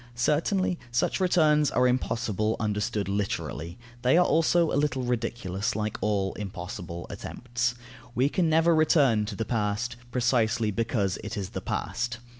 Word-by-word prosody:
Certainly, 165 +8 +1
such 120 - +1
returns 155 -5 +4
are 125 0 +3
impossible, 115 -4 0
understood 105 -1 -1
literally; 95 -4 -3 0.2
they 130 +5 +4
are 180 - +5
also 165 +1 +3
a - - -2
little 135 -2 +1
ridiculous, 115 -2 -2
like 105 0 -2
all 100 -3 0
impossible 90 -3 -6
attempts. 120 0 -3 0.4
We 130 +3 +3
can 170 +2 +1
never 165 +2 +4
return 140 -9 +3
to 105 - -5
the 115 - -2
past, 115 +2 -1
precisely 120 -3 +1
because 105 -3 -1
it 110 +1 -5
is 95 -3 -3
the - - -5
past. 125 0 -2
120 Hz, 145 wpm, -27 LUFS, 105-140 Hz, 0.4 s, are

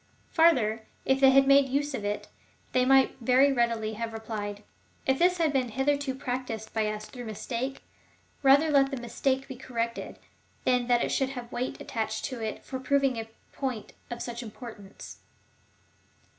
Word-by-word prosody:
Farther, 235 -10 +3 0.2
if 265 0 +2
they 270 -1 +7
had 275 +1 +6
made 275 0 +5
use 285 +2 0
of 220 - -4
it, 205 0 -3 0.4
they 255 0 +3
might 270 0 +5
very 260 +4 +4
readily 230 -3 0
have 225 +1 -4
replied: 210 -2 -5 0.2
" - - -36
If 265 0 +2
this 360 +1 +4
has 325 -3 +2
been 255 -3 +1
hitherto 270 +3 0
practised 250 -4 -4
by 220 -1 +1
us 215 0 -4
through 245 0 -9
mistake, 240 +4 -4 0.6
rather 285 +3 +5
let 275 -1 +4
the 275 - -4
mis 240 -1 -9
take 265 0 +1
be 265 - -7
corrected, 235 -2 -4 0.5
than 250 -1 +2
that 240 -1 +3
it - - -1
should 265 -1 +1
have 245 -3 -7
weight 250 +1 -3
attached 220 -5 -3
to 255 -4 -5
it 220 - -5
for 260 - -5
proving 270 -1 +1
a 225 0 -6 0.2
point 255 -6 -4 0.2
of 240 -1 -5
such 240 0 -5
importance. 220 -3 -10
250 Hz, 175 wpm, -28 LUFS, 225-270 Hz, 0.6 s, they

